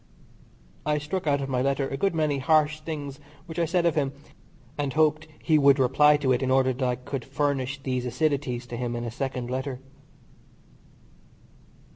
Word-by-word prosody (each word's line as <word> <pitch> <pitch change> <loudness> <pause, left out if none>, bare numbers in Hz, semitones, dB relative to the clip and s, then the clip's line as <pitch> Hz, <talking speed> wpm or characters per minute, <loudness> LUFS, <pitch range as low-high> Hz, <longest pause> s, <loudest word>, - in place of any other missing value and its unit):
I 150 +1 +1
struck 155 +4 -3
out 140 -1 +2
of 135 - -4
my 125 -1 0
letter 135 +1 0
a 135 - -4
good 195 +4 0
many 150 -3 +1
harsh 155 +2 +3
things 150 -3 -6 0.3
which 165 -1 -6
I 170 - +3
said 175 +1 +1
of 170 - +3
him, 140 -3 0 0.6
and 145 -3 -2
hoped 155 0 +2 0.2
he 155 -2 +4
would 140 -1 +6
reply 145 +3 +5
to 140 -3 0
it 125 - +2
in 130 - 0
order 130 0 +3
that 130 +2 -4
I 125 - 0
could 125 +1 -5
furnish 140 -1 -1
these 125 -2 -2
acidities 135 -2 -1
to 120 - -5
him 120 -1 -3
in 120 - -3
a 120 - -4
second 125 -1 -4
letter. 130 0 -3
140 Hz, 185 wpm, -26 LUFS, 130-150 Hz, 0.6 s, would